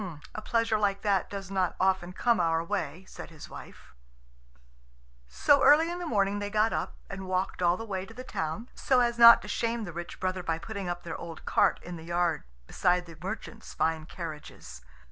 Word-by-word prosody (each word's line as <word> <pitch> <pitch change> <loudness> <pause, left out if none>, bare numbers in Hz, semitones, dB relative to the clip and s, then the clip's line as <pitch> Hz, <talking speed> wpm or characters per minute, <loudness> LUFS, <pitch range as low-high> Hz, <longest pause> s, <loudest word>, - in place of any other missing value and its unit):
"A 215 - -5
pleasure 230 -1 +1
like 200 -1 0
that 200 -3 +1
does 195 -1 -7
not 185 -3 0
often 185 -2 +1
come 235 +4 +1
our 165 -1 +2
way," 190 0 -3
said - - -10
his 160 -3 -11
wife. - - -12 1.3
So 280 - +3
early 320 +3 +6
in 350 - -4
the 350 - -4
morning 200 -4 +1
they 205 0 -3
got 215 +2 +2
up, - - -3
and 190 -1 -7
walked 185 0 -1
all 175 0 +3
the 225 - -6
way 190 -3 -4
to 225 - -12
the 255 - -7
town, 165 +2 -4
so 260 -2 +2
as 235 -1 +1
not 235 0 +9
to - - -8
shame 230 0 -1
the 175 -5 -7
rich 170 +1 -7
brother 185 0 -1
by 165 -2 -1
putting 200 +1 -5
up 175 0 -4
their 170 - -5
old 165 -2 -9
cart - - +3
in 175 0 -7
the 160 - -10
yard 170 -2 0 0.2
beside 180 - +1
the 165 -1 -12
merchants' 220 +3 -7
fine 160 -1 0
carriages. 155 - -8
190 Hz, 205 wpm, -29 LUFS, 175-220 Hz, 1.3 s, not